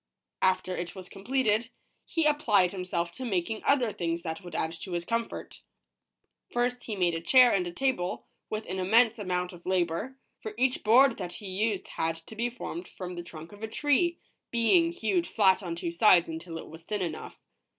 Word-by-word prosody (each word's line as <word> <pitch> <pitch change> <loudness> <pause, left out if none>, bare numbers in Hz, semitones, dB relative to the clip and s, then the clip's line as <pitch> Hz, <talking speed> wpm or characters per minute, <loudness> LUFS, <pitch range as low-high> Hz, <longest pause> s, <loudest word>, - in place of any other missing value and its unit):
After 185 -1 +2
it 175 +2 -5
was 185 -1 -8
completed, 225 +1 0 0.4
he 325 -2 0
applied 215 -12 +3
himself 180 -2 -2
to 260 - -8
making 215 -1 -1
other 255 -6 +3
things 170 -2 -2
that 160 +1 -4
would 175 -3 -9
add 160 - 0
to 185 - -6
his 170 0 -2
comfort. 230 +2 -3 0.9
First, 245 0 -1
he 215 - -3
made 180 -3 +2
a 165 - -3
chair 250 +6 +6
and 180 -3 +1
a - - -4
table, 180 - -1 0.2
with 215 0 -3
an 190 +1 -4
immense 225 +4 +4
amount 180 -2 -2
of 175 0 -13
labor, 185 +7 -1 0.2
for 215 -1 -7
each 255 +1 +1
board 235 +3 +6
that 175 -2 -5
he 205 - -9
used 200 +2 -1
had 165 0 -1
to 165 +7 -12
be 235 +2 0
formed 340 +8 -6
from 180 -1 -7
the 175 - -5
trunk 165 -1 -10
of 205 0 -13
a 220 - -3
tree, 295 +8 +1 0.3
being 330 +9 +3
hewed 350 0 0
flat 195 -3 +4
on 175 -3 -4
two 170 -1 -3
sides 175 -1 +5
until 165 +1 -6
it - - -8
was 160 +1 -11
thin 200 +3 -3
enough. 160 -3 -5
195 Hz, 195 wpm, -29 LUFS, 175-240 Hz, 0.9 s, chair